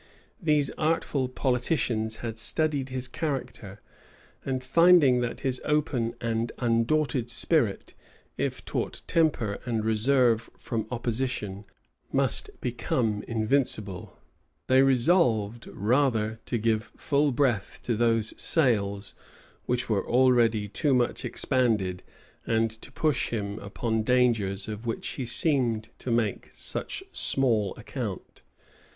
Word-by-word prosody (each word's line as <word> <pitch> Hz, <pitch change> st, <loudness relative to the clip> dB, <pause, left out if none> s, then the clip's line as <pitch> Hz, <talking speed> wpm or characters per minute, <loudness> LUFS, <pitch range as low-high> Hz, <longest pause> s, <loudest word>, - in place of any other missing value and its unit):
These 150 Hz, -4 st, +2 dB
artful 155 Hz, -4 st, 0 dB
politicians 125 Hz, -4 st, 0 dB
had 115 Hz, -1 st, -4 dB
studied 145 Hz, +1 st, +2 dB
his 130 Hz, -1 st, -2 dB
character; 125 Hz, -9 st, -5 dB, 0.6 s
and 130 Hz, -1 st, -2 dB
finding 150 Hz, -3 st, +5 dB
that 120 Hz, -1 st, -3 dB
his 130 Hz, -1 st, -1 dB
open 140 Hz, -6 st, 0 dB
and 115 Hz, 0 st, -1 dB
undaunted 120 Hz, +2 st, +1 dB
spirit, 120 Hz, -, 0 dB, 0.4 s
if -, -, -3 dB
taught -, -, -3 dB
temper 140 Hz, -11 st, +1 dB
and 115 Hz, -3 st, -2 dB
reserve 115 Hz, +1 st, +2 dB
from 110 Hz, -2 st, -4 dB
opposition, 115 Hz, -5 st, -3 dB, 0.5 s
must -, -, +1 dB
become 115 Hz, -3 st, -1 dB
invincible, 110 Hz, -5 st, -1 dB, 0.5 s
they 130 Hz, +1 st, +5 dB
resolved 120 Hz, -, +2 dB
rather 110 Hz, -1 st, 0 dB
to 120 Hz, -, 0 dB
give 110 Hz, 0 st, 0 dB
full 145 Hz, 0 st, +1 dB
breath 120 Hz, -6 st, 0 dB
to 120 Hz, -, 0 dB
those 115 Hz, -1 st, +1 dB
sails 100 Hz, -9 st, +1 dB, 0.5 s
which 125 Hz, 0 st, 0 dB
were 105 Hz, -4 st, -1 dB
already 120 Hz, -4 st, +3 dB
too 135 Hz, +7 st, +1 dB
much 120 Hz, -1 st, 0 dB
expanded 110 Hz, -9 st, 0 dB, 0.5 s
and 115 Hz, 0 st, +1 dB
to 110 Hz, +4 st, -10 dB
push 150 Hz, -1 st, 0 dB
him 105 Hz, -2 st, -3 dB
upon 110 Hz, +3 st, -2 dB
dangers 110 Hz, -5 st, +1 dB
of 110 Hz, +2 st, -6 dB
which 115 Hz, -, -3 dB
he 130 Hz, -4 st, -5 dB
seemed 120 Hz, -5 st, +2 dB
to -, -, -6 dB
make 115 Hz, -4 st, 0 dB
such -, -, -3 dB
small 115 Hz, -7 st, +1 dB
account. -, -, -6 dB
120 Hz, 115 wpm, -27 LUFS, 110-130 Hz, 0.6 s, finding